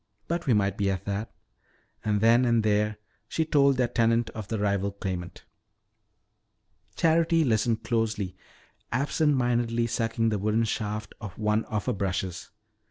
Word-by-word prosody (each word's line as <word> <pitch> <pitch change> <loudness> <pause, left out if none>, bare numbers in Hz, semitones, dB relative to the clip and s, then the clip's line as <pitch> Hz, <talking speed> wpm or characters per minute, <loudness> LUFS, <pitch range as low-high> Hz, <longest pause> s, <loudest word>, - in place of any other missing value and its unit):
"But 170 -1 -2
we 120 - +4
might 100 -1 +1
be 100 -1 +2
that." 100 +3 -3 0.7
And 105 -1 0
then 115 +3 +5
and 115 -2 +2
there 105 0 +1 0.3
she 160 - -1
told 140 -3 +3
their 125 -1 +2
tenant 115 -1 +1
of 110 -3 -7
the 110 - -2
rival 100 -1 0
claimant. 95 -3 -5 1.5
Charity 165 0 +3
listened 115 -3 +1
closely, 110 -4 -1 0.6
absent 145 +4 +1
mindedly 120 -2 +1
sucking 115 0 0
the 105 -2 -1
wooden 110 +3 +1
shaft 105 -1 -3
of 100 -5 -8
one 105 0 +1
of 105 -2 -3
her - - 0
brushes. 95 -2 -3
110 Hz, 145 wpm, -27 LUFS, 105-120 Hz, 1.5 s, then